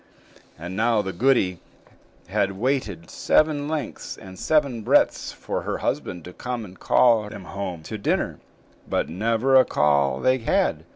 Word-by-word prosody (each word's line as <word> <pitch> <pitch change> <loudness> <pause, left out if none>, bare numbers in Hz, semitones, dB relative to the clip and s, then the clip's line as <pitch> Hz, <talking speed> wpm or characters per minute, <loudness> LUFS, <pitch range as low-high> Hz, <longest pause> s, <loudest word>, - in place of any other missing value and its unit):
And 85 +3 -7
now 110 0 +2
the 95 -1 -4
goody 95 -5 +2 0.7
had 95 +1 0
waited 105 - -2
seven 150 -2 +2
lengths 155 -1 -4
and 95 -1 -11
seven 140 -7 +1
breadths - - +2
for - - -4
her - - -3
husband 90 -3 -3
to 90 - -9
come 125 0 -4
and 95 -1 -14
call 115 -4 +3
them 105 - -9
home 90 -4 -6
to 110 +6 -6
dinner; - - -1 0.5
but - - 0
never 115 +8 +1
a 130 - +8
call 70 - +2
they 130 0 +2
had. 115 - 0
105 Hz, 155 wpm, -24 LUFS, 90-130 Hz, 0.7 s, a